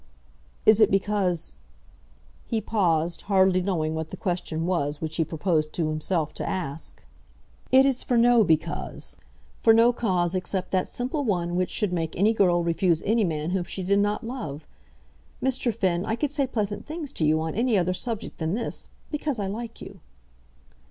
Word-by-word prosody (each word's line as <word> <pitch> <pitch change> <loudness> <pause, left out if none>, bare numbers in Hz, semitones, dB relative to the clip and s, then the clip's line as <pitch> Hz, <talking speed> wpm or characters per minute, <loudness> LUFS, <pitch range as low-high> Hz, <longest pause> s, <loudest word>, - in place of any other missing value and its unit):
"Is 215 0 +6
it 215 - +6
because 190 - 0 0.4
?" - - -30
He 225 - 0
paused, 175 -6 0
hardly 190 -2 +4
knowing 165 -4 -1
what 160 0 -4
the - - -7
question 175 -3 -2
was 150 -5 -1
which 160 -1 -4
he 165 - +3
proposed 155 -1 -1
to 160 -3 -1
himself 155 0 -1
to - - -4
ask. 160 -5 -5 0.7
"It 265 +1 +7
is 270 -2 +1
for 245 - 0
no 235 -1 +6
because, 160 -5 -1 0.4
for 225 -1 +6
no 235 +2 +5
cause 180 -7 0
except 185 0 -2
that 185 -1 +1
simple 260 +4 -3
one 175 -7 -1
which 180 0 0
should 205 -4 0
make 165 -2 -2
any 210 +5 +4
girl 175 -5 +3
refuse 170 0 +1
any 220 +2 +3
man 160 -2 -1
whom 185 -2 -1
she 190 - -4
did 200 +2 +2
not 205 +1 0
love. 160 - -6 0.7
Mr. 260 -2 0
Finn, 185 -5 0
I 220 +1 -1
could 285 +3 -2
say 280 -2 0
pleasant 210 -4 -3
things 305 -2 -6
to - - -2
you 155 +1 +3
on 160 0 -2
any 230 0 +2
other 185 0 +1
subject 220 +4 -4
than 160 +3 -1
this, 235 - -3 0.2
because 295 -3 -1
I 205 - -2
like 225 +4 -6
you." 195 - -10
185 Hz, 180 wpm, -26 LUFS, 165-225 Hz, 0.7 s, It